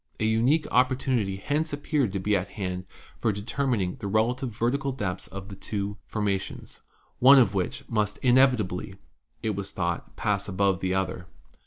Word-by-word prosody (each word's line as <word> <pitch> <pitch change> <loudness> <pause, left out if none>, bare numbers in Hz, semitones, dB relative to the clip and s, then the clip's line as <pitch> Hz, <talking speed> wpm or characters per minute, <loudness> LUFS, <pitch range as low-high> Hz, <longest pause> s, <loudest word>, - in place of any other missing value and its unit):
An 110 - +1
unique 120 +8 +3
opportunity 125 -5 +2
hence 145 +9 -1
ap 145 - -14
peared 140 - +1
to 100 - -1
be 105 +2 +1
at 95 0 -1
hand 95 -3 -4 0.3
for 115 - +2
determining 105 -1 -1
the 110 -5 -5
relative 120 +5 +1
vertical 125 +6 -1
depths 95 -7 -3
of 100 0 -8
the 100 - -7
two 100 +1 -4
formations, 100 -3 -3 0.4
one 135 +3 +9
of 115 -6 +5
which 95 -2 -2
must 105 -3 0
inevit 130 -1 +5
ably, 95 0 -5 0.5
it 110 - +1
was 100 -1 -4
thought, 85 -2 -3
pass 100 -1 0
above 95 -1 +1
the 95 - -1
other. 95 -1 -2
105 Hz, 170 wpm, -27 LUFS, 95-125 Hz, 0.5 s, one